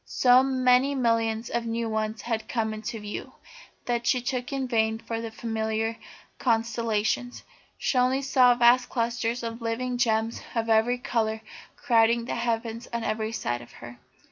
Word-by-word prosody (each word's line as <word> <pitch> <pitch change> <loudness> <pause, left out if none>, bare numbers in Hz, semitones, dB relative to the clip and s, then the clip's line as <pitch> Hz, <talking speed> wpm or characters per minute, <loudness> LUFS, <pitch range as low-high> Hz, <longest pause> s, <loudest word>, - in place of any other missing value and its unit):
So 250 0 +4
many 260 +1 +3
millions 230 -2 0
of 235 -1 -1
new 230 0 -2
ones 220 0 -2
had 225 -2 -3
come 220 -3 -1
into 220 +2 -5
view, 210 0 -7 0.5
that 240 0 -1
she 255 - +4 0.2
looked 250 +3 -3
in 270 -1 -2
vain 220 -2 +1
for 230 0 -5
the 230 - -5
familiar 220 0 -2 0.4
constellations. 230 0 0 0.3
She - - -2
saw 250 -2 +3
only 260 +2 0
vast 250 -2 +5
clusters 235 0 -1
of 230 +1 -5
living 245 +2 -2
gems 225 -2 +1
of 230 0 -1
every 225 +3 +3
colour 220 -3 -1 0.3
crowding 230 0 +3
the - - -3
heavens 230 0 -2
on 235 -1 -3
every 220 0 -2
side 120 - -3
of 120 - -14
her. 120 0 -11
230 Hz, 160 wpm, -26 LUFS, 220-245 Hz, 0.5 s, vast